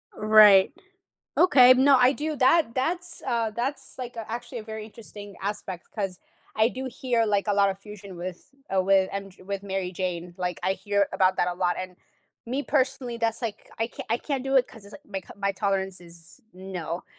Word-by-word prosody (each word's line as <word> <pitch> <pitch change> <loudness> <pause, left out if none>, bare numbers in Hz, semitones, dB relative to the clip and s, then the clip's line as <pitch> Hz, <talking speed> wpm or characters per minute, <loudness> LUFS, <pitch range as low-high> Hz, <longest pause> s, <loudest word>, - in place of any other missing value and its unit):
Right, 210 -2 +7 0.7
okay, 255 -8 +7
no, 270 +1 +5
I 250 +2 +5
do 305 +2 -3
that 265 -1 +3
that's, 345 +6 -2
uh, 230 -3 0
that's, 245 +6 -4
like, 245 -1 -6
uh, 225 - -5
actually 240 +2 -5
a 220 - -7
very 220 0 -7
interesting 205 -2 -11
aspect, 195 -3 -5
'cause 195 -4 -3 0.4
I 220 +1 +4
do 260 +2 -6
hear, 245 -2 0
like, 205 -1 +1
a 205 - +2
lot 200 -1 +4
of 190 - -6
fusion 200 -2 -11
with, 180 +6 -8 0.2
uh, - - +1
wi 190 0 +3
and 195 0 -5
J - - -18
with 200 +1 -4
Mary 190 -2 -3
Jane, 175 -1 -4
like, 180 -1 -3
I 190 - +2
hear 200 0 0
about 185 0 +2
that - - +2
a 175 - -2
lot, 175 -1 0
and 185 -1 -6 0.5
me 260 +4 -2
personally, 260 -4 0
that's, 230 -1 0
like, 225 -3 -5
I 225 - +1
c - - -8
I 230 - +3
can't 275 -2 -3
do 270 0 +1
it 255 - +4
'cause 225 -3 -15
it's, 200 - -14
like, 295 - -13
my 195 -2 -4
c - - -23
my 200 0 -1
tolerance 195 -1 -1
is 170 -1 -14
no. 180 -2 -6
210 Hz, 210 wpm, -26 LUFS, 190-245 Hz, 0.7 s, Right